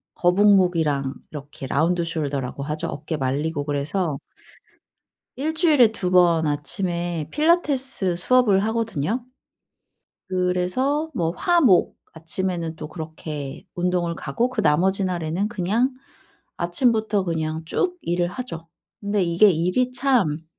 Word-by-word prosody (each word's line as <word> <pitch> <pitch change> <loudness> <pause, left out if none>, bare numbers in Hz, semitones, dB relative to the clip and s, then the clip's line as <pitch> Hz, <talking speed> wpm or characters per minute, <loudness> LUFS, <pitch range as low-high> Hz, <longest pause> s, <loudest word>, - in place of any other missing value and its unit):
거북목이랑 175 -7 +3 0.2
이렇게 145 -2 -8
라운드 165 +6 +1
숄더라고 140 -5 -3
하죠. 150 +1 -3
어깨 155 +2 -4
말리고 145 +3 -1
그래서 145 +2 -2 1.2
일주일에 305 - +3
2 180 -4 -3
번 170 -3 +4
아침에 170 +2 -2
필라테스 275 - +1
수업을 205 0 +3
하거든요? 225 - -2 1.0
그래서 185 - 0
뭐 165 -6 0
화, 345 - +2
목 190 -9 +4 0.2
아침에는 165 0 -3
또 155 - -7
그렇게 155 -1 -7
운동을 175 -1 0
가고 230 - -2
그 245 -4 -1
나머지 190 +3 +2
날에는 175 +3 -2
그냥 230 +5 0 0.6
아침부터 215 +2 +1
그냥 160 -1 -2
쭉 360 - -1
일을 175 0 0
하죠. 170 -8 -7 0.3
근데 200 -1 0
이게 175 +5 +5
일이 185 +10 0
참 235 - +1
180 Hz, 260 characters per minute, -23 LUFS, 160-220 Hz, 1.2 s, 이게